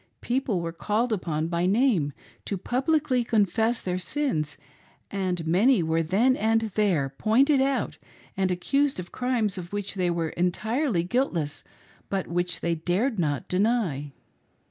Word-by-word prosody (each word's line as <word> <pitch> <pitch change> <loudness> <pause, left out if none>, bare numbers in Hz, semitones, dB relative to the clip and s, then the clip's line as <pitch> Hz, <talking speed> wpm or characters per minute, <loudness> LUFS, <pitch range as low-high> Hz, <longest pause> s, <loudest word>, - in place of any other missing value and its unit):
People 240 -7 0
were 165 - -3
called 215 +7 0
upon 160 -5 -1
by 170 +1 0
name 200 - +2 0.3
to 200 - -2
publicly 260 - +1
confess 225 +1 +1
their 180 0 -2
sins, 180 - -2 0.5
and 185 -4 -2
many 195 +5 +4
were 160 +1 +1
then 215 +11 +3
and 225 0 +2
there" 185 -10 +2
pointed 265 +6 +4
out 270 0 0 0.4
and 190 -1 +1
accused 275 +9 +1
of 175 -1 -7
crimes 235 -6 0
of 175 -1 -8
which 205 -1 -3
they 185 -3 0
were 170 -2 -1
entirely 215 - 0
guiltless 175 - -1 0.5
but 195 -2 -1
which 175 +1 -2
they 170 - +1
dared 185 - 0
not 145 -5 -1
deny. 185 - 0
195 Hz, 145 wpm, -26 LUFS, 170-245 Hz, 0.5 s, many